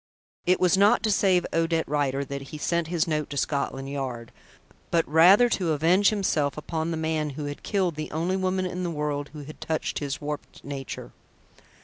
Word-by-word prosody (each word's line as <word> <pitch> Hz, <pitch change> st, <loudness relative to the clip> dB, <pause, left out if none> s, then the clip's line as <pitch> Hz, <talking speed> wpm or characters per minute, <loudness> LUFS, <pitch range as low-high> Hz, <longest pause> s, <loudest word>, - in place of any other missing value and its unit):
It 180 Hz, 0 st, +4 dB
was 180 Hz, +1 st, +4 dB
not 210 Hz, +5 st, +5 dB
to 215 Hz, -, +2 dB
save 185 Hz, -3 st, +3 dB
Odette 165 Hz, 0 st, +1 dB
Rider 140 Hz, -1 st, 0 dB
that 140 Hz, 0 st, -5 dB
he 155 Hz, -, -7 dB
sent 170 Hz, +2 st, 0 dB
his 170 Hz, -1 st, 0 dB
note 150 Hz, -2 st, -1 dB
to 140 Hz, -, -5 dB
Scotland 135 Hz, -1 st, -1 dB
Yard, 130 Hz, -4 st, -5 dB, 0.6 s
but 165 Hz, -1 st, +2 dB
rather 180 Hz, +10 st, +7 dB
to 175 Hz, -8 st, 0 dB
avenge 175 Hz, +7 st, +4 dB
himself 160 Hz, -10 st, 0 dB
upon 160 Hz, +1 st, -3 dB
the 165 Hz, -, -2 dB
man 160 Hz, -1 st, -1 dB
who 150 Hz, -, -3 dB
had 145 Hz, 0 st, -6 dB
killed 190 Hz, -5 st, 0 dB
the 155 Hz, 0 st, -5 dB
only 170 Hz, +4 st, -1 dB
woman 185 Hz, 0 st, 0 dB
in 180 Hz, 0 st, -4 dB
the 175 Hz, -, -1 dB
world 150 Hz, -2 st, -2 dB
who 150 Hz, -2 st, -8 dB
had 155 Hz, +2 st, -11 dB
touched 160 Hz, -1 st, -2 dB
his 145 Hz, 0 st, -3 dB
warped 150 Hz, 0 st, -6 dB
nature. 140 Hz, -1 st, -6 dB
160 Hz, 195 wpm, -26 LUFS, 145-180 Hz, 0.6 s, rather